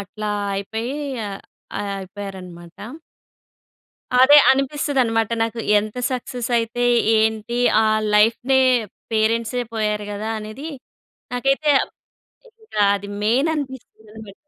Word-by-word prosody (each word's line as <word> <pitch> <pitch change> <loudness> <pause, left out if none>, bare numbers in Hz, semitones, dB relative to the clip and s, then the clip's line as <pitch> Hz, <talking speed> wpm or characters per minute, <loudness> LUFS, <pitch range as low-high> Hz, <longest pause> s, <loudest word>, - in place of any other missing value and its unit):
అట్లా 210 +1 -5 0.3
అయిపోయి, 220 +5 -4 1.1
అయిపోయారనమాట. 190 - -9 1.2
అదే 260 +4 +7
అనిపిస్తది 275 +1 0
అన్నమాట 225 -2 0
నాకు, 230 0 -2 0.2
ఎంత 215 +3 -5
సక్సెస్ 250 -1 -4
అయితే 230 +1 -3 0.4
ఏంటి? 220 +1 0 0.3
ఆ - - +2 0.3
లైఫ్‌నే, 235 +5 +3 0.5
పేరెంట్సే 230 +2 +1
పోయారు 210 -1 -1
కదా! 210 +2 -4
అనేది, 215 +8 -7 0.6
నాకైతే 275 +4 +1 0.9
ఇంకా 215 - -3
అది 200 0 -7 0.2
మెయిన్ 255 +9 +2
అనిపిస్తుంది 255 -6 -8
మరి 195 - -12
225 Hz, 95 wpm, -21 LUFS, 210-255 Hz, 1.2 s, అదే